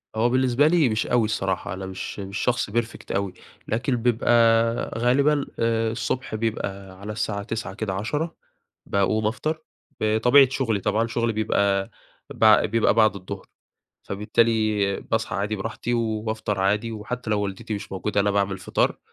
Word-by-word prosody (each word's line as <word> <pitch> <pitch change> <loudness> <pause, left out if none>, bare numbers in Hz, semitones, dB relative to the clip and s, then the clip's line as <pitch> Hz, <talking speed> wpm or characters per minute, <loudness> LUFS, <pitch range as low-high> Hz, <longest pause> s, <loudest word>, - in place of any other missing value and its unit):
هو 115 +2 +2
بالنسبة 130 +3 +3
لي، 160 -5 +4
مش 110 0 -1
أوي 120 -2 +3
الصراحة، 95 -4 -2
أنا 95 +1 -6
مش 95 +2 -6
مش 100 0 -5
شخص 125 -3 0
perfect 115 +2 -3
أوي، 100 -1 -1 0.3
لكن 125 +4 0
بيبقى 120 0 0 0.7
غالبًا، 140 +4 +3
آآ، 115 -1 +1
الصبح 120 0 -3
بيبقى 100 -4 -4
على 105 +2 -6
الساعة 105 -1 -2
09:00 115 +2 -4
كده 100 -4 -3
10:00 145 - -2 0.5
باقوم 105 +2 +1
أفطر، 155 +8 -2 0.4
بطبيعة 120 +5 +5
شغلي 120 -6 0
طبعًا، 110 +4 0
شغلي 115 -1 0
بيبقى 100 -2 +1 0.4
بع - - +5
بيبقى 110 -1 +2
بعد 110 -2 +4
الضُّهر، 90 -2 -7 0.6
فبالتالي 105 -1 +1
باصحى 110 0 -2
عادي 105 +2 -1
براحتي 115 +4 -3
وبافطر 110 -3 -2
عادي، 105 +4 +1
وحتى 110 +2 -5
لو 105 - +2
والدتي 105 +2 -4
مش 100 -1 -7
موجودة 100 +2 0
أنا 100 +1 +2
باعمل 100 -1 +1
الفطار، 95 - 0
110 Hz, 150 wpm, -24 LUFS, 100-120 Hz, 0.7 s, بطبيعة